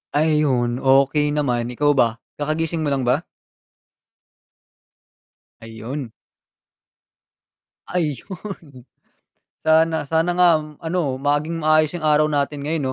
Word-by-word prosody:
Ayun, 140 -6 +1
okey 140 +2 +3
naman, 125 -5 0
ikaw 145 +4 +1
ba? 120 -5 +2 0.2
Kakagising 160 +2 -1
mo 155 - -1
lang 140 -2 0
ba? 125 +3 +2 2.4
Ayun. 115 +3 -7 1.7
Ayun. 165 - -5 0.8
Sana 160 0 +3
sana 165 +4 +1
nga 180 -1 +6
ano 160 +4 -4 0.2
maging 145 +4 -1
maayos 155 -1 +4
yung 155 - -5
araw 150 0 +4
natin 145 0 -1
ngayon, 150 0 -2
150 Hz, 95 wpm, -21 LUFS, 135-160 Hz, 2.4 s, nga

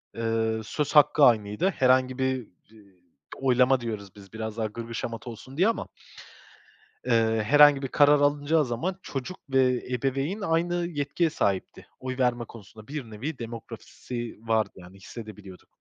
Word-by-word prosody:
eee 115 -1 -1
söz 145 +7 -3
hakkı 150 0 +6
aynıydı. 110 - +3
Herhangi 130 -5 +2
bir 130 -2 -1
d 105 +3 -27 0.7
oylama 130 0 +3
diyoruz 105 -4 -6
biz 100 0 -15
biraz 110 0 -5
daha 110 - -1
gırgır 115 +2 -8
şamata 115 +1 -5
olsun 120 +4 -11
diye 185 +6 +4
ama 230 - -1 1.2
eee 115 -2 +2
herhangi 145 +3 +6
bir 135 - -2
karar 145 +2 +5
alınacağı 145 +1 +2
zaman 170 +11 -3
çocuk 145 +6 -6
ve 130 -2 +2
ebeveyn 135 - -1
aynı 170 -1 0
yetkiye 155 +1 -1
sahipti. 100 -10 -2
Oy 130 0 -5
verme 125 -2 +1
konusunda 110 -1 -14
bir 135 -6 -6
nevi 130 +7 -5
demokrasi 120 +1 -7
vardı 110 -1 +1
yani 90 +1 -14
hissedebiliyorduk. 105 -2 -11
125 Hz, 145 wpm, -26 LUFS, 110-145 Hz, 1.2 s, hakkı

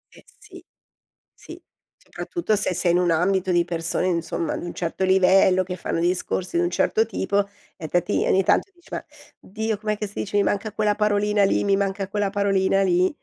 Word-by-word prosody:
Eh - - -17
sì, 375 -4 -14 0.7
sì, - - -13 0.3
soprattutto 340 - -3
se 205 -2 -1
sei 175 0 +1
in - - +3
un 180 -1 +2
ambito 185 +3 +1
di 175 -1 +2
persone, 170 +1 -1
insomma, 170 -2 -2
di - - -6
un 175 - -6
certo 175 +2 -3
livello, 190 0 +4
che 185 0 -4
fanno 165 - -3
discorsi 180 +1 -1
di 170 - +2
un 175 - -1
certo 220 +5 +1
tipo 200 -1 -1 0.3
e 160 - -6
fatti 175 +2 0
ogni 190 - +3
tanto 295 - +1
dici: 345 -1 -23
"Ma - - -5 0.3
Dio, 220 +2 -4
com'è 215 +1 -2
che 210 0 -4
si 200 - -8
dice? 205 - -5
Mi - - +4
manca 205 +2 -2
quella 210 -1 +1
parolina 210 0 +1
lì, 195 - +2
mi 200 -1 +2
manca 195 0 -2
quella 200 0 -1
parolina 195 -1 +1
lì". 180 -1 +3
195 Hz, 200 wpm, -23 LUFS, 180-205 Hz, 0.7 s, livello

